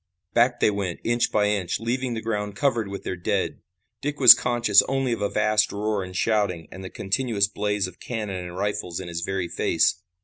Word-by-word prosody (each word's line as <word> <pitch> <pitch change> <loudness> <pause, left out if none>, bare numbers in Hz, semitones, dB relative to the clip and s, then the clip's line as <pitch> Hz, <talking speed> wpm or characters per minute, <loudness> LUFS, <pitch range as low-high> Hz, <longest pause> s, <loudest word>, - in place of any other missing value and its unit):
Back 120 +1 +2
they - - +4
went, 100 -4 -3
inch 120 +1 +1
by 105 -1 +2
inch, 100 -4 -1
leaving 120 +2 -2
the 110 - -5
ground 105 -2 -3
covered 120 -7 0
with 100 0 -7
their 95 - -3
dead. 90 - -2 0.4
Dick 145 +1 -3
was 125 -3 +11
conscious 120 -4 +3
only 135 -1 0
of 115 - -5
a 100 - 0
vast 105 0 +2
roar 105 -1 -2
and 90 0 -9
shouting 100 -7 0
and 95 - -9
the 95 - -7
continuous 100 0 0
blaze 105 -1 -1
of 95 -1 -10
cannon 105 -6 -5
and 90 0 -8
rifles 100 -3 -3
in - - -7
his 85 0 -4
very 95 0 -2
face. 85 0 +1
105 Hz, 205 wpm, -24 LUFS, 95-115 Hz, 0.4 s, was